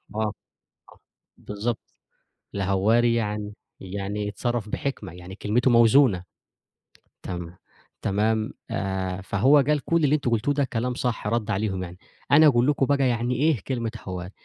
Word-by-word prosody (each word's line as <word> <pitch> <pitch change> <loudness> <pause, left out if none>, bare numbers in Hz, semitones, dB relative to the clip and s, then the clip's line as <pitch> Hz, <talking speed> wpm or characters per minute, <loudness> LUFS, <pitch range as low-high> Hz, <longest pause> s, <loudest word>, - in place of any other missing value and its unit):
آه، 110 -1 0 1.1
بالضبط، 105 +3 -5 0.6
الهوّاري 105 +5 +2
يعني 105 -2 -2 0.3
يعني 100 +2 -4
يتصرّف 115 +1 -2
بحكمة، 105 - -4
يعني 90 +1 -10
كلمته 115 +5 +1
موزونة، 115 -4 +5 1.0
تم 85 -2 -6 0.5
تمام، 110 +2 0 0.2
آآ 95 -1 -2
فهو 105 +9 +4
قال 145 +2 +3
كل 165 -1 +2
اللي 145 +1 +3
أنتم 140 -5 -1
قلتوه 115 +5 +1
ده 145 0 +1
كلام 125 0 -2
صح، 120 -4 -2
رد 115 0 -1
عليهم 95 -2 -1
يعني، 90 0 -8 0.3
أنا 155 +2 +8
أقول 120 -3 +4
لكم 145 -2 +2
بَقى 140 -1 +2
يعني 120 +1 0
إيه 145 -2 +2
كلمة 120 -4 -2 0.2
هوّاري، 90 0 -5
110 Hz, 135 wpm, -25 LUFS, 100-125 Hz, 1.1 s, أنا